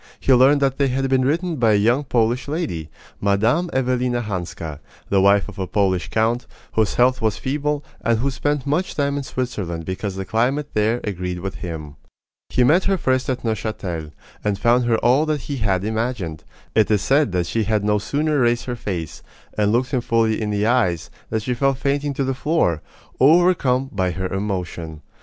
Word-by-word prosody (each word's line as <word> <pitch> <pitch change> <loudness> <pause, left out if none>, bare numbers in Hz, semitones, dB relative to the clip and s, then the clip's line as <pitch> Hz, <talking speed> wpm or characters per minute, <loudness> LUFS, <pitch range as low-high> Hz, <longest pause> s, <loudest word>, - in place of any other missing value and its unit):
He 135 - +3
learned 135 +3 +5
that 135 0 0
they 140 - +3
had 135 +1 0
been 130 -1 +3
written 165 +3 0
by 115 -3 +3
a - - +5
young 120 +7 +3
Polish 120 0 +1
lady, 140 - -3 0.3
Mme. 110 - +2
Evelina 125 -1 0
Hanska, 85 -6 -5 0.3
the 100 -1 +3
wife 100 +1 +4
of 105 -2 -10
a 95 - -2
Polish 95 -3 0
count, 115 +2 0 0.2
whose 110 -2 +1
health 125 +1 +3
was 110 -2 0
feeble, 145 +2 -2 0.2
and 115 -1 +2
who 135 +5 0
spent 145 0 -1
much 155 +6 -1
time 140 -1 0
in 145 - -1
Switzerland 105 - -4
because 95 +2 -4
the 95 0 -4
climate 130 +8 0
there 110 +3 +1
agreed 90 -3 -4
with 95 +1 -5
him. 75 -4 -7 0.5
He 125 - +2
met 160 +9 +4
her 195 - +2
first 130 -5 0
at 130 -1 -2
Neuchatel, 100 -8 -3 0.3
and 105 -2 0
found 120 +2 +3
her 115 -1 +2
all 135 +6 +4
that 150 -2 0
he 140 +1 -5
had 100 -5 0
imagined. 110 -8 -3 0.3
It 110 -1 +3
is 105 -2 +2
said 140 -4 +3
that 90 -1 +1
she 110 +5 -1
had 105 0 +1
no 105 0 +2
sooner 150 +6 0
raised 120 -1 +2
her 125 - -3
face, 90 -9 -5 0.3
and 105 -1 +2
looked 125 +3 +1
him 130 -3 +1
fully 115 -2 +1
in 105 - -1
the 105 0 0
eyes, 110 -9 +1 0.2
than 110 -1 -1
she 125 +4 -1
fell 135 +2 +1
fainting 140 +1 -1
to 140 - 0
the 135 0 0
floor, 130 - 0 0.4
overcome 140 -4 +4
by 95 -2 0
her 95 +2 -3
emotion. 90 -5 -4
115 Hz, 195 wpm, -21 LUFS, 100-135 Hz, 0.5 s, learned